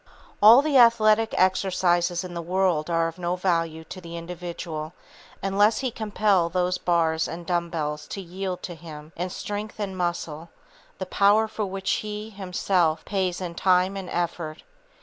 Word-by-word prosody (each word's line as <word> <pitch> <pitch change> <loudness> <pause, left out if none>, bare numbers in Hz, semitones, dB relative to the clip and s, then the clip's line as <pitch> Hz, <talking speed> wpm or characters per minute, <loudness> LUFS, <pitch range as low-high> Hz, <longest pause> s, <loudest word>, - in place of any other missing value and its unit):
All 230 +6 +9
the 290 -3 +4
athletic 225 -2 +5
exercises 180 -2 +2
in 180 -1 -7
the 170 - -4
world 175 -2 0
are 165 -1 +2
of 165 +2 -8
no 175 0 -1
value 165 -3 -1
to 185 +3 -9
the 170 -1 -8
individual 170 -2 -6 0.5
unless 205 +3 +3
he 260 -2 -1
compel 205 -5 +1
those 180 +1 0
bars 165 -2 +1
and 170 +1 -7
dumb 175 -1 -1
bells 150 -2 -3
to - - -6
yield 185 0 -5
to 175 - -5
him, 155 -1 -11
in 180 +2 -3
strength 210 +3 -5
and 195 -2 -3
muscle, 170 -2 -3 0.5
the 190 - -4
power 205 +4 +3
for 215 -1 -3
which 190 0 -3
he, 210 +1 -6
himself, 180 -4 0
pays 185 -3 -1
in 180 -2 -5
time 185 +2 +2
and 190 -2 -6
effort. 170 -2 -3
180 Hz, 165 wpm, -25 LUFS, 170-195 Hz, 0.5 s, All